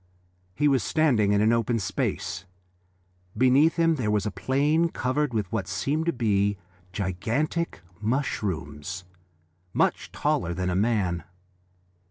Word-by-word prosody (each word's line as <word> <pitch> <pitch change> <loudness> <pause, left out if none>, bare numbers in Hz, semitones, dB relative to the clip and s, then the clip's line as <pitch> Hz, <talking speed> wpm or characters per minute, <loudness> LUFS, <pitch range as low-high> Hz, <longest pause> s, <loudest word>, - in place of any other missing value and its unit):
He 145 - +2
was 135 -3 +3
standing 125 -11 +2
in 100 0 +3
an 110 +2 +4
open 115 0 +1
space; 100 -3 -2 0.9
beneath 130 +6 +5
him 165 -2 +3
there 115 -5 -1
was 105 -2 +1
a 105 - -1
plain 140 - +1
covered 145 0 -1
with 105 -5 -2
what 105 -5 -2
seemed 140 - -1
to - - +4
be 100 -5 +1 0.3
gigantic 110 - -2 0.2
mushrooms, 95 - -2 0.7
much - - +1
taller 85 0 0
than 90 0 -1
a - - -1
man. 95 -5 +1
110 Hz, 130 wpm, -26 LUFS, 95-140 Hz, 0.9 s, beneath